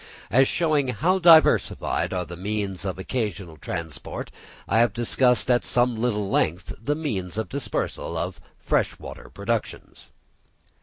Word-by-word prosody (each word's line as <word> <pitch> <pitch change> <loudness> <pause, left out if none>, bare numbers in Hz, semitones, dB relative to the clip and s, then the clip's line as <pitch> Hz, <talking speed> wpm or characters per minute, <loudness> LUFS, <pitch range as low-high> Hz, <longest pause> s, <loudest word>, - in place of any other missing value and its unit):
As 130 +5 +5
showing 155 -5 +1
how 175 +9 +1
diversified 165 -3 +4
are 90 -1 -2
the 85 - -8
means 100 0 -3
of 95 -1 -3
occasional 95 -5 -3
transport, 80 -2 -6 0.4
I 110 - +2
have 115 -4 +3
discussed 125 +2 +2
at 120 - +3
some 120 0 +2
little 110 -3 -1
length 85 -1 0
the 145 +6 0
means 105 - -4
of 110 - -2
dispersal 140 -1 -3
of - - -4 0.2
fresh - - 0
water - - -10
productions. - - -4
110 Hz, 140 wpm, -24 LUFS, 95-130 Hz, 0.4 s, As